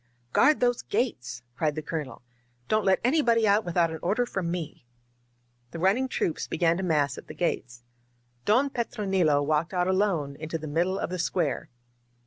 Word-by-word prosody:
"Guard 300 - +4
those 245 -1 +2
gates!" 125 - -2
cried 150 +1 0
the 155 - -4
Colonel. 150 -5 -5 0.4
"Don't 215 +6 +1
let 190 -1 +4
anybody 235 -5 +3
out 205 +2 +4
without 170 -2 +1
an 160 - -5
order 215 +7 +1
from 190 -7 -3
me!*' 170 -7 -5 0.9
The 165 - -8
run 190 +4 +4
ning 260 +3 -1
troops 170 -9 -2
began 165 0 +2
to - - -2
mass 145 -5 +1
at - - -15
the - - -9
gates. 125 -8 -2 0.6
Don 255 - +3
Petro* 235 -4 -3
nilo 165 -7 +3
walked 155 +5 0
out 180 0 +1
alone 185 -8 0
into 155 +1 -4
the 155 - -8
middle 175 +6 0
of - - -3
the 185 - -3
square. 170 -4 -1
175 Hz, 180 wpm, -27 LUFS, 155-210 Hz, 0.9 s, Guard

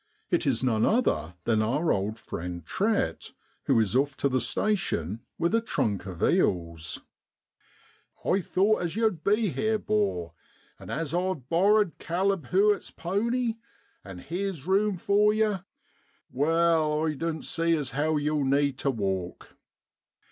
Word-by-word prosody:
It - - +1
is - - +1
none 115 -4 +2
other 215 - +1
than 110 0 +2
our 140 +10 +1
old 100 +3 -1
friend 85 -5 -6
Trett, 210 - -1 0.3
who - - +3
is 110 +1 +1
off 140 +1 +1
to 140 - +1
the 130 -1 +1
station 115 - -1 0.2
with 170 +4 0
a 230 - +3
trunk 100 - -1
of 90 -3 -6
eels. 85 -2 0 1.2
<I 195 - +3
thowt 200 +3 +1
as 170 0 -3
yow'd 220 -8 0
be 210 +1 +2
here, 215 +10 0
'bor, 200 - -1 0.5
an' - - -11
as 160 -2 -3
I've 180 -7 -1
borrered 200 +2 +3
Caleb 185 -3 -1
Hewitt's 200 +7 +2
pony 230 +6 -1 0.5
an' 95 -2 -9
heer's 175 - -4
rume 195 +1 +2
for 210 +3 +3
yer, 210 -4 0 0.7
wal, 155 +2 +2
I 155 - 0
doan't 160 +1 -3
see 165 0 +1
as 145 -5 -3
how 155 +2 0
yow'll 150 0 0
need 140 0 +1
tu 140 - 0
walk.' 95 -7 -3
160 Hz, 145 wpm, -27 LUFS, 120-200 Hz, 1.2 s, who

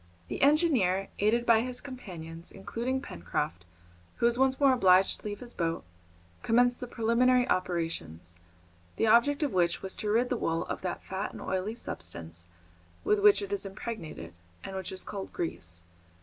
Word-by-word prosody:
The - - -4
engineer, 270 - +3
aided 230 +4 +2
by 225 -2 +5
his 250 +1 -3
companions, 170 - -8
including 240 +7 -3
Pencroft, 85 0 -3 0.5
who - - 0
was 235 +1 +3
once 265 0 +3
more 275 -2 +6
obliged 190 -5 +4
to - - -20
leave 205 0 -5
his 245 -1 -8
boat, 165 -1 -1 0.6
commenced 245 +1 +3
the 250 - -5
preliminary 245 +2 +3
operations, 165 - -2 0.6
the - - +1
object 240 +7 +4
of 285 - 0
which 175 -2 +1
was 190 - -3
to 210 - -2
rid 235 +4 +2
the 250 - 0
wool 165 -5 -1
of - - -4
that 180 -2 -4
fat 190 +2 -4
and - - -8
oily 190 +4 -2
substance 85 - -4 0.6
with 210 - +3
which 205 0 +6
it 200 0 -4
is 200 - -2
impregnated, 195 - -6 0.3
and 195 - -6
which 190 -2 -4
is 185 -1 -4
called 195 -2 -6
grease. 85 - -3
200 Hz, 170 wpm, -30 LUFS, 170-245 Hz, 0.6 s, more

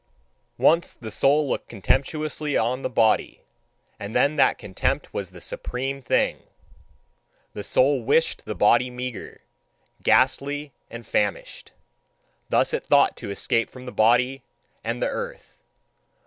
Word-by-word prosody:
Once 170 +2 +3
the 110 -2 -9
soul 140 +7 +3
looked - - -3
contemptuously 145 - -1
on 125 +4 0
the - - -2
body, 110 -3 +1 0.6
and 100 +3 -7
then 145 +2 +3
that 145 - +3
contempt 95 - -2
was 100 -3 -4
the 90 0 -13
supreme 135 +9 -4
thing: 125 - 0 1.1
the 105 - -6
soul 135 +3 +2
wished 145 +7 +1
the 105 - -4
body 120 +4 +4
meagre, 125 -1 -7 0.6
ghastly, 140 +2 +1 0.2
and 115 -1 -9
famished. 105 -1 -2 0.8
Thus - - +2
it - - -3
thought - - +4
to - - -7
escape 115 +3 0
from 130 0 -12
the 125 - -6
body 125 +4 +2 0.4
and - - -2
the - - +2
earth. - - -6
125 Hz, 135 wpm, -24 LUFS, 110-140 Hz, 1.1 s, body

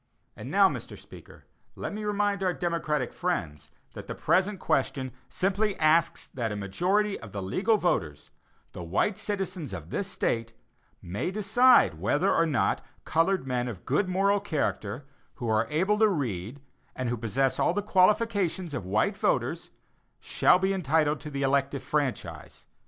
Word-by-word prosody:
And - - -8
now, - - +5
Mr. - - -6
Speaker, - - -15 0.3
let - - -5
me 210 +1 -5
remind 205 -1 0
our 180 -2 0
democratic 155 -6 -1
friends 85 - -3 0.2
that - - -9
the - - -5
present 190 +2 +1
question 130 -1 -1 0.2
simply 195 +2 0
asks 165 +2 +2
that 115 -4 -2
a - - -3
majority 185 - 0
of 105 -3 -11
the 100 - -4
legal 205 - +1
voters, 80 - -2 0.4
the - - -8
white 90 - 0
citizens 185 - -4
of 85 -3 -8
this 200 - -2
State, 115 -11 -2 0.5
may 95 - -3
decide 215 +6 +4
whether - - +2
or 165 - +3
not 140 -5 0 0.2
colored 165 0 +1
men 125 -1 -1
of 110 -7 -7
good 195 -2 +1
moral 200 +2 +2
character, 140 - -3 0.3
who 120 - -5
are 110 -1 +2
able 190 +7 +1
to 220 -1 +5
read 125 - -3 0.3
and 130 - -3
who 120 - 0
possess 125 +4 0
all 175 - +2
the 205 - -1
qualifications 190 -4 +2
of 110 -9 -4
white 105 +3 +1
voters, - - -1 0.5
shall - - +3
be 190 +1 0
entitled 155 -4 +1
to 150 - -8
the 140 -1 -3
elective 140 0 0
franchise. 145 -4 -3
160 Hz, 160 wpm, -27 LUFS, 120-195 Hz, 0.5 s, now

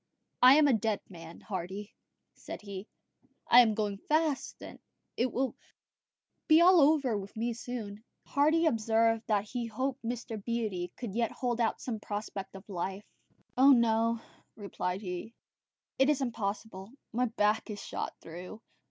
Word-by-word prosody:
"I 255 +2 +9
am 300 -1 +6
a 275 - +4
dead 220 -1 0
man, 165 -2 -11
Hardy," 195 +1 -6 0.4
said - - -9
he; 200 0 -7 0.6
"I 245 - +9
am 220 -3 +2
going 205 -2 -2
fast; 310 -2 0 0.6
it 245 +1 0
will 260 +3 -1 0.9
be 315 0 +7
all 355 0 +7
over 280 -5 +3
with 200 +1 -6
me 235 +2 -1
soon." 225 -3 -6 0.2
Hardy 310 +4 +3
observed 225 -3 +2
that 210 -2 +2
he 240 -2 -3
hoped 260 +4 -3
Mr. 230 -2 -5
Beatty 210 -7 -2
could 235 -6 -5
yet 230 +1 0
hold 240 -2 -2
out 225 - 0
some 230 -4 -4
prospect 205 -2 -6
of 190 - -11
life. 195 +1 -4 0.5
"Oh, 275 +2 +7
no," 230 -1 +3 0.4
he - - -15
replied; 190 -1 -3
"it 180 +4 -5 0.8
is 295 -2 +2
impossible. 215 -5 -4 0.2
My 250 +2 +2
back 220 -2 +1
is 205 -1 -5
shot - - -5
through. 180 +6 -9
225 Hz, 150 wpm, -30 LUFS, 200-250 Hz, 0.9 s, I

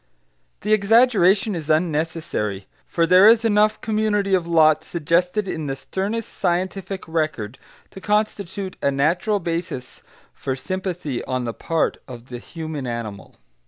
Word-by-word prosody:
The 210 +2 +1
exaggeration 210 -2 +4
is 160 -3 -5
unnecessary, 155 - -1 0.2
for 170 - +1
there 185 +4 +7
is 230 +1 +6
enough 210 -1 +3
community 210 -2 0
of 180 -3 +2
lot 155 -2 +4
suggested 180 +5 0
in 160 -4 -3
the 135 - -2
sternest 200 +10 -3
scientific 185 +1 -2
record 155 -9 -2 0.3
to 190 - -11
constitute 200 -2 -1
a - - +2
natural 170 +9 +1
basis 165 -7 -4 0.3
for 130 - -3
sympathy 180 -4 -4
on 130 -1 -2
the 115 - -3
part 165 +6 -1
of 125 -1 -10
the 120 -1 -6
human 155 -2 -6
animal. 115 -4 -6
170 Hz, 135 wpm, -22 LUFS, 150-200 Hz, 0.3 s, there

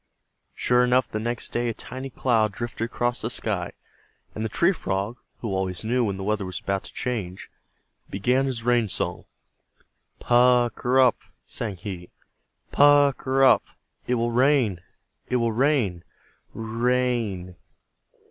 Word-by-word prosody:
Sure 125 0 +3
enough, 125 +1 +3
the 110 - -4
very - - -5
next 120 0 -3
day 120 0 0
a 115 - -4
tiny 130 +2 -7
cloud 115 -4 +1
drifted 115 +2 -4
across 120 +1 -2
the - - -2
sky, - - -3 0.6
and 110 - -4
the 110 - -2
Tree 170 - +3
Frog, 100 - -3 0.2
who 115 - -3
always 95 -1 -2
knew 120 +3 +1
when 100 -4 -1
the 95 - -5
weather 105 0 -1
was 95 -1 -5
about 100 0 -2
to - - -11
change, 105 -8 -4 0.6
began 125 +8 +1
his 120 -4 -3
rain 120 -3 +2
song. - - -2 0.9
"Pukr 120 -1 +3
r - - 0
rup!" 130 -2 +5 0.3
sang 105 -4 -5
he, 90 -1 -7 0.6
"Pukr 145 -1 +5
r - - -1
rup! 130 - +6 0.4
It 125 - +1
will 120 0 0
rain! 125 -7 +2 0.5
It 125 - 0
will 115 -2 +1
rain! 115 - +1 0.5
R 115 - -5
r - - -6
r 110 - -7
rain!" 120 -7 0
120 Hz, 160 wpm, -25 LUFS, 100-125 Hz, 0.9 s, rup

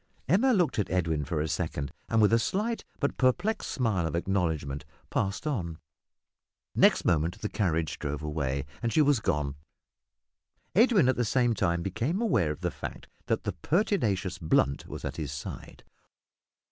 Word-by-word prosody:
Emma 210 - +4
looked 180 - +2
at 105 - 0
Edwin 80 -5 0
for 75 +2 -2
a 80 - -1
second, 70 -2 -2 0.2
and, 115 -1 +4
with 105 - +4
a 115 - +5
slight 215 - -1 0.2
but 140 - -1
perplexed 180 - +1
smile 105 -10 0
of 80 - -3
acknowledgment, 80 -6 -1 0.3
passed 100 +7 -1
on. 90 - -2 1.0
Next - - +4
moment 85 0 +1
the 105 - -1
carriage 80 -6 -1
drove 75 0 -3
away, 70 -3 -2 0.2
and 120 -1 0
she 155 - +4
was 145 -4 +3
gone. 75 -7 -1 1.2
Edwin 210 - +5
at 130 - +2
the 120 - +2
same 120 +1 +2
time 85 -5 0
became 115 - -1
aware 120 - +2
of 75 - -4
the - - -1
fact - - -7 0.2
that - - 0
the - - -2
pertinacious 105 - 0
Blunt 75 -4 +1
was - - -7
at - - -4
his 75 -4 -3
side. 75 - -8
95 Hz, 165 wpm, -29 LUFS, -, 1.2 s, a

